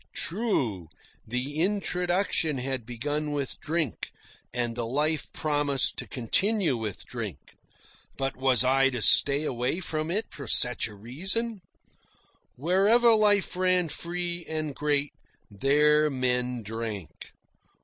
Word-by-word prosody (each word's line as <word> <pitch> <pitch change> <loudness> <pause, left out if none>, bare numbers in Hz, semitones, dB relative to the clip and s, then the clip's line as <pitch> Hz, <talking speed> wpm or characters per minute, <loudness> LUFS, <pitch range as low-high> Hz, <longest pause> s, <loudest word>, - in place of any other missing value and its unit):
True, 165 - -1 0.4
the 130 +6 -3
introduction 180 -4 0
had 130 -2 -4
begun 145 +5 -3
with 140 -2 -4
drink, 160 -5 -3 0.4
and 120 -1 -2
the 120 -1 -3
life 150 +5 -1
promised 145 -3 0
to - - -6
continue 170 - 0
with 110 -4 -6
drink. 105 - -8 0.6
But 135 0 -2
was 130 -1 +4
I 135 +1 +3
to 120 -4 -3
stay 140 +1 +6
away 130 +3 -1
from 155 -3 -3
it 210 +6 -1
for 140 - -9
such 125 -1 +6
reason? 185 - -2 0.9
Wherever 200 - +3
life 205 -4 +2
ran 180 -2 +1
free 175 +2 -4
and 155 -2 -3
great, 145 0 -1 0.4
there 150 +7 +3
men 125 -2 -1
drank. 110 -5 -7
145 Hz, 120 wpm, -27 LUFS, 125-175 Hz, 0.9 s, stay